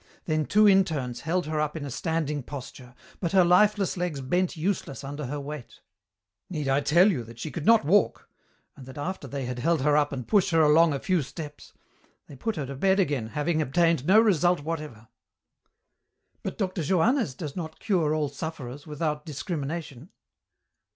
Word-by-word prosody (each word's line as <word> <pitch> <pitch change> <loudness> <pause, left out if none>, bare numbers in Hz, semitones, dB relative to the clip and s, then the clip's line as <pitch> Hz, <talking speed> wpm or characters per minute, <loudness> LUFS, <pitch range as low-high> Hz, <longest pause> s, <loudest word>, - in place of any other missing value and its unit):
Then 155 -2 0
two 210 +1 +5
interns 160 -11 +2
held 175 +2 -1
her 155 0 -2
up 150 +1 -2
in 145 - -5
a 140 - -6
standing 155 -1 -2
posture, 125 -2 -9 0.2
but 175 0 -2
her 185 -2 +6
lifeless 195 +2 +3
legs 175 -5 -2
bent 175 +7 -1
useless 160 -5 -2
under 145 0 -5
her 145 +3 -4
weight. 145 -2 -8 0.7
Need 155 -6 -3
I 135 +1 +2
tell 170 +8 +5
you 130 -10 -2
that 115 0 -13
she 155 +6 -5
could 160 - -5
not 225 -8 +6
walk, 200 +7 +2 0.5
and 130 - -12
that 130 - -10
after 145 0 -4
they 135 0 -4
had 125 0 -4
held 165 +2 +1
her 150 0 +3
up 150 -1 +2
and 130 -4 -5
pushed 205 -4 +3
her 165 -2 +3
along 155 +2 +5
a 140 - -2
few 185 0 +1
steps, 150 +1 -9 0.5
they 145 - -12
put 225 - -3
her 150 -4 -3
to 135 - -6
bed 190 +8 +2
again, 145 - 0
having 155 +6 -1
obtained 165 0 +2
no 200 +4 +7
result 180 -6 +3
whatever." 150 -8 -6 1.3
"But - - -5
Dr. 185 -3 -2
Johannès 185 - +1
does 150 -4 -6
not 160 -3 -6
cure 170 -8 +1
all 150 -2 0
sufferers, 145 -2 -7
without 150 0 -2
discrimination?" 155 - -5
155 Hz, 185 wpm, -26 LUFS, 140-175 Hz, 1.3 s, no